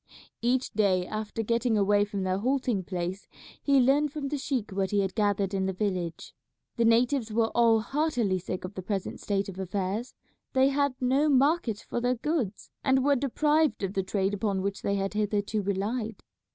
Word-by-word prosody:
Each 250 +2 +1
day 190 -4 +2
after 215 +2 -4
getting 230 0 +1
away 205 0 +3
from 200 -2 -4
their 185 0 0
halting 245 -5 0
place 180 +1 -4 0.3
he 280 -1 +4
learned 280 +3 +3
from 290 -2 -4
the 295 - -2
sheik 260 -6 -2
what 190 0 -1
he 205 0 +2
had 190 -1 -2
gathered 205 -2 +1
in 190 -1 0
the 190 - -1
village. 180 -4 -3 0.4
The 235 - +3
natives 235 +1 +3
were 225 +1 +2
all 230 -2 +4
heartily 245 -8 0
sick 185 +1 -5
of 185 - -7
the 190 - -5
present 195 0 -3
state 200 -1 -1
of 190 -1 -8
affairs. 195 +5 -3 0.4
They 265 +1 +4
had 280 -1 +1
no 270 +4 +2
market 275 -5 +2
for 240 - -2
their 250 +1 +1
goods, 250 - -2
and 265 -1 +3
were 285 0 +4
deprived 295 +1 +1
of 195 0 -2
the 195 - +1
trade 195 +1 -1
upon 200 -2 -1
which 200 0 -3
they 200 - 0
had 195 0 -2
hitherto 210 0 0
relied. 205 +3 -2
215 Hz, 190 wpm, -28 LUFS, 195-255 Hz, 0.4 s, he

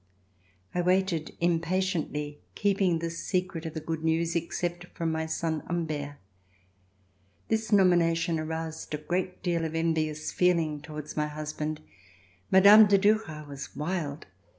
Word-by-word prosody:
I 180 - +1
waited 180 -3 +1
impatiently, 165 -3 -1 0.2
keeping 195 -4 +2
the 165 0 -3
secret 180 -1 -2
of 160 - -8
the - - -2
good 160 0 -4
news, 165 +1 +1
except 175 +1 -2
from 165 -1 0
my 160 0 -2
son 160 -1 -1
Humbert. 155 -4 -3 1.3
This 220 0 0
nomination 170 -4 +3
aroused 160 0 -4
a - - -3
great 180 +4 -3
deal 170 -2 0
of 160 0 -3
envious 155 -2 -1
feeling 165 -5 +1
towards 150 -1 -8
my 150 -1 0
husband. 155 0 -4 0.7
Mme. 205 +3 +8
de 200 0 +5
Duras 195 -7 +1
was 140 -1 -8
wild. 155 -2 -3
165 Hz, 130 wpm, -28 LUFS, 155-180 Hz, 1.3 s, Mme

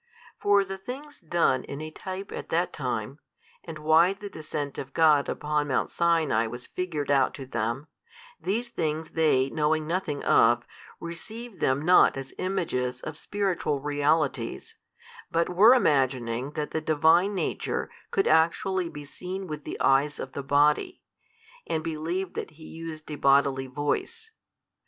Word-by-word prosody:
For 200 -1 +4
the 195 0 -6
things 280 +8 -8
done 165 -7 +1
in 140 - -7
a 155 0 -6
type 190 +4 -7
at - - -6
that - - 0
time, - - -3 0.4
and 155 - -8
why 160 +4 +4
the 205 0 -9
descent 150 -2 -5
of 135 0 -7
God 155 -3 +4
upon 150 0 -1
Mount 130 - 0
Sinai 160 -9 +2
was 120 +2 -7
figured 155 -6 -3
out 135 -2 +3
to 135 - -7
them, 120 +2 -2 0.5
these 230 +6 -1
things 160 -7 -3
they 135 -5 +2
knowing 155 0 +1
nothing 165 -3 -2
of, 120 +1 +4 0.3
received 215 +7 -7
them 135 +3 +1
not 180 -5 +6
as 135 0 -7
images 125 -10 -2
of 155 - -6
spiritual 185 -6 -1
realities, 145 -3 0 0.5
but 165 +1 +1
were 210 +8 +7
imagining 130 - +1
that 150 -1 -3
the 160 - -2
Divine 160 +6 +3
Nature - - -2 0.2
could 390 - +1
actually 170 +3 +2
be 145 -2 -9
seen 185 +6 -6
with 150 -4 -7
the - - -6
eyes 140 +2 +3
of 130 - -5
the 140 - -5
body, 150 - +2 0.6
and 160 -1 -1
believed 165 +4 -3
that - - -4
He 160 - -13
used 160 -1 -8
a 150 - -4
bodily 135 -1 +3
voice. 145 - -3
155 Hz, 150 wpm, -27 LUFS, 140-180 Hz, 0.6 s, were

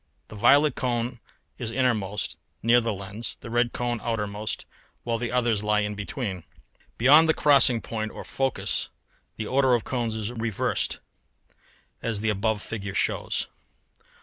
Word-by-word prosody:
The - - -10
violet 145 +7 +5
cone 120 -1 -2 0.4
is 115 - -2
innermost, 110 -5 0 0.3
near 120 +2 +5
the 115 -1 -1
lens, 100 +3 -5
the 115 - -8
red 120 0 +2
cone 120 -1 -2
outermost, 105 -2 -3 0.4
while 115 -1 -1
the 120 0 -2
others 120 -4 +2
lie 105 0 +1
between. 100 - -4 0.5
Beyond 150 +7 +6
the 160 - +4
crossing 140 -5 +5
point 110 -1 -4
or - - -8
focus 135 -3 -1 0.5
the 110 - -3
order 130 +1 +3
of 115 - -1
cones 120 -4 -2
is 110 +1 -3
reversed, 115 -4 -1 1.0
as 115 -3 -1
the 110 0 +1
above 105 +1 -1
figure 100 -3 -5
shows. - - 0
115 Hz, 145 wpm, -26 LUFS, 105-125 Hz, 1.0 s, Beyond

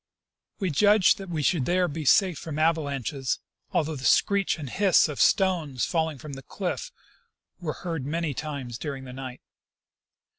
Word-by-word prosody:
We 190 -4 -1
judged 205 +6 +5
that 195 -2 -8
we 160 -3 -2
should 140 -3 +2
there 180 0 +2
be 155 0 -5
safe 185 +3 +4
from 155 -2 -6
avalanches, 145 -4 0 0.3
although 155 0 0
the 130 - -8
screech 200 +7 +3
and 150 -4 -6
hiss 190 +6 +4
of 150 - -3
stones 165 -10 +2
falling 160 -3 -1
from 145 +2 -9
the 135 - -7
cliff 200 - -4 0.7
were 160 -4 -3
heard 165 -5 -2
many 160 +2 -2
times 135 -5 -5
during 140 -3 -5
the 125 -1 -9
night. 130 -1 -7
155 Hz, 160 wpm, -26 LUFS, 140-180 Hz, 0.7 s, judged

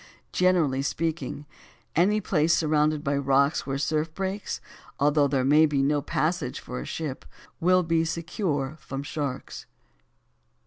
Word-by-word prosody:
Generally 170 -8 +2
speaking, 150 -1 -3 0.5
any 200 +6 +3
place 170 -3 +2
surrounded 155 -1 +2
by 140 +1 0
rocks 140 +2 +2
where 135 - -1
the - - -2
surf 155 +3 0
breaks, 195 +1 -3 0.4
although 145 0 +4
there 135 -2 0
may 150 +3 +6
be 140 -2 +1
no 145 +1 +2
passage 150 -2 -1
for 125 - -6
a - - -6
ship, 150 -5 -5 0.4
will 185 +2 +4
be 165 -1 +2
secure 160 -4 -2
from 135 0 -6
sharks. 145 -3 -5
150 Hz, 140 wpm, -26 LUFS, 140-165 Hz, 0.5 s, may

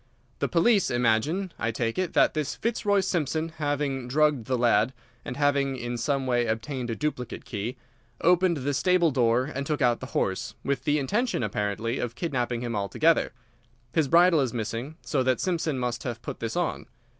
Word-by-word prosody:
"The - - +1
police 195 +4 +3
imagine, 125 - +1
I 110 - 0
take 115 +4 -2
it, 185 -2 -1
that - - +4
this 155 -2 -2
Fitzroy 205 -3 +1
Simpson, 160 -3 -1
having 145 -3 -1
drugged 145 -2 +2
the 130 -1 +1
lad, 120 0 +3 0.3
and 125 - -6
having 140 -2 +2
in 120 0 -4
some 135 +3 -1
way 120 -2 +1
obtained 120 +3 -3
a 115 - -1
duplicate 150 -4 -4
key, 110 +3 -4 0.4
opened 180 0 +3
the 140 +1 -1
stable 180 +2 +3
door 120 -2 +3
and 140 - -2
took 150 +1 -2
out 120 -1 +2
the 130 - -7
horse, 95 -1 -1
with 135 -1 -2
the 150 0 +3
intention, 205 - 0
apparently, 105 +3 -2
of 120 -1 -3
kidnapping 125 -7 -2
him 120 -2 -3
altogether. 105 - +2 0.6
His 160 -3 +2
bridle 170 0 +5
is 125 -3 -1
missing, 115 +6 -4
so 140 - 0
that 130 -1 +1
Simpson 165 -6 -1
must 125 -2 -2
have 120 -2 -5
put - - -6
this 115 -1 -3
on. 175 -2 -2
135 Hz, 180 wpm, -27 LUFS, 120-155 Hz, 0.6 s, bridle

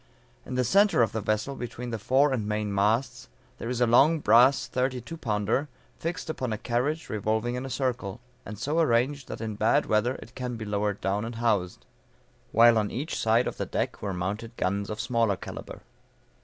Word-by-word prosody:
In 130 - -4
the 125 - +2
centre 195 - +4
of 110 - 0
the 110 - -3
vessel, 110 +7 -1
between 120 0 -6
the 115 - -3
fore 135 +6 +3
and 110 -5 -2
main 105 -1 -2
masts, 105 - 0 0.3
there 115 - -4
is 125 -1 -2
a - - +6
long 135 +8 +5
brass 125 +2 +5
thirty 125 +1 -1
two 145 +8 -8
pounder, 115 +1 -1 0.3
fixed 170 +2 -4
upon 130 -6 -3
a 110 - -1
carriage 135 +7 -1
revolving 110 +3 -1
in 125 +2 -4
a - - -7
circle, 125 -7 -2 0.2
and 105 +1 -8
so 145 +9 -1
arranged 135 -1 +1
that - - -7
in 110 -1 -3
bad 110 +2 +2
weather 110 +4 +1
it 115 - -12
can 125 -2 -4
be 110 -1 -6
lowered 105 -1 -1
down 100 +2 0
and 115 +1 -5
housed; 105 -6 -1 0.7
while 115 0 +6
on 105 -1 -1
each 150 +6 -4
side 115 +2 +2
of - - -4
the - - -3
deck - - -2
were 100 - -2
mounted 105 +6 -4
guns 100 +2 -1
of 105 - -5
smaller 115 -4 +1
calibre. - - -8
115 Hz, 200 wpm, -27 LUFS, 105-130 Hz, 0.7 s, a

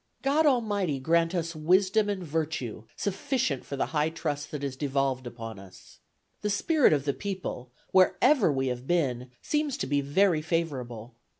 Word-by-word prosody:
God 295 +3 +3
Almighty 205 - +1
grant 165 +5 +2
us 170 -1 -2
wisdom 190 +6 +3
and 195 -3 -2
virtue 150 -8 -3
sufficient 195 - -1
for 140 - -6
the 135 - 0
high 150 0 +2
trust 150 -3 -4
that 150 -2 -5
is 135 -2 -3
devolved 135 -2 -1
upon 115 -3 -7
us. 95 -1 -15 0.4
The 210 - -1
spirit 295 +8 +3
of 145 -2 +1
the 140 - +1
people, 180 -11 -5 0.2
wherever 200 - +4
we 135 -1 0
have 125 +1 -5
been, 130 -8 0
seems 300 -2 0
to - - -2
be 145 +1 +1
very 160 +4 +2
favorable. 130 -9 -3
155 Hz, 165 wpm, -28 LUFS, 135-195 Hz, 0.4 s, wherever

